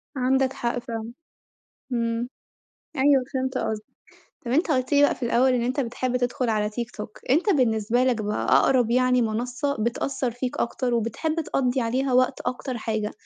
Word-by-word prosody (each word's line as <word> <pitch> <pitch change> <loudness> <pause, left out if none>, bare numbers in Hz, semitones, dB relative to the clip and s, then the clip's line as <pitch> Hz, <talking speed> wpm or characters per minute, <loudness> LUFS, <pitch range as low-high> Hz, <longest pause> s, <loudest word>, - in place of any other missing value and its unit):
عندك 265 0 +2
حق 240 0 -2
فعلًا، 230 -1 -6 0.8
إمم، 230 0 -1 0.7
أيوه 270 -1 +4
فهمت 260 0 -1
قصدك، 215 -1 -2 0.6
طَب 235 - -3
أنت 315 +5 +2
قُلت 255 0 0
لي 285 - +5
بقى 290 - +4
في - - -7
الأول 250 +2 +3
إن 245 - +1
أنت 255 +4 -1
بتحب 250 0 -1
تدخل 245 -1 -1
على 210 -1 +1
tiktok 225 -1 -5 0.2
أنت 325 - +3
بالنسبة 240 - +2
لك 245 -4 +1
بقى 210 0 -2
أقرب 245 -3 +4
يعني 250 0 +3
منصّة 245 +5 -1
بتأثّر 245 +3 -1
فيك 245 +2 -4
أكتر 245 +1 -1
وبتحب 235 +9 -1
تقضي 260 -3 0
عليها 255 +3 0
وقت 255 0 +2
أكتر 255 0 -3
حاجة 215 -2 -2
250 Hz, 165 wpm, -25 LUFS, 230-260 Hz, 0.8 s, لي